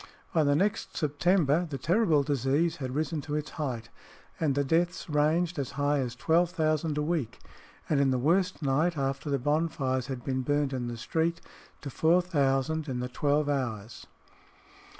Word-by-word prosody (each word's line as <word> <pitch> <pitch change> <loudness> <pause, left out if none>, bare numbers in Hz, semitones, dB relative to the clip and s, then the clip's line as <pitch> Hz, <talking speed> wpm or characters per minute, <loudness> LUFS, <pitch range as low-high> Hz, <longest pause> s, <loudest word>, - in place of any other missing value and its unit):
By 160 - +3
the 145 -1 +3
next 200 +6 -1
September 160 +1 +2
the 140 - -4
terrible 165 - +2
disease 145 +4 +1
had 130 -2 -5
risen 155 0 -1
to 145 +1 -4
its 150 0 -3
height, 120 -7 -4 0.5
and 150 -4 +1
the 140 - +2
deaths 170 +5 0
ranged 155 +3 +1
as 135 - -4
high 145 +1 +1
as 125 -3 -3
12,000 160 0 +1
a 150 - +1
week, 150 -8 -2 0.5
and 150 - +2
in 140 -1 +3
the 130 - +1
worst 175 +6 +1
night 150 +5 +1
after 135 +1 -2
the 140 - +1
bonfires 140 -2 0
had 130 -3 -5
been 130 -1 -1
burned 145 +1 0
in 125 -2 -2
the 120 -1 -5
street, 165 +7 -1 0.4
to 140 - -6
4000 160 -2 +1
in 125 -2 -2
the 125 0 -3
twelve 145 +3 +1
hours. 120 -7 -3
145 Hz, 170 wpm, -28 LUFS, 135-160 Hz, 0.5 s, By